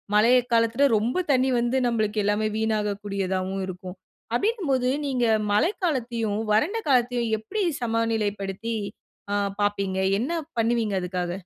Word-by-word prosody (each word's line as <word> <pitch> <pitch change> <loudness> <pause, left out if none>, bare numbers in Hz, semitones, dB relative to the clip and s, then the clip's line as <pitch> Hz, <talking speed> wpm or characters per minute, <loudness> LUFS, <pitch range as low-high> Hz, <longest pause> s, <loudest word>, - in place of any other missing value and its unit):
மழை 215 +3 +5 0.2
காலத்தில 230 +4 +3
ரொம்ப 245 - 0
தண்ணீ 260 0 +3
வந்து, 240 +2 +1
நம்மளுக்கு 215 -2 0
எல்லாமே 210 +1 +1
வீணாகக்கூடியதாவும் 200 -3 -1
இருக்கும். 180 0 -7 0.4
அப்டிங்கும்போது 275 - +1 0.2
நீங்க 255 -3 +1 0.3
மழைக்காலத்தையும், 235 - 0 0.2
வறண்ட 315 - +2
காலத்தையும் 245 -2 +2
எப்டி 400 - -3 0.2
சமநிலைப்படுத்தி 225 -2 -1 0.6
அ - - +2 0.3
பார்ப்பீங்க? 200 -2 0 0.2
என்ன 250 +10 -2 0.3
பண்ணுவீங்க 230 -2 +1
அதுக்காக? 180 -1 -3
225 Hz, 110 wpm, -25 LUFS, 205-245 Hz, 0.6 s, மழை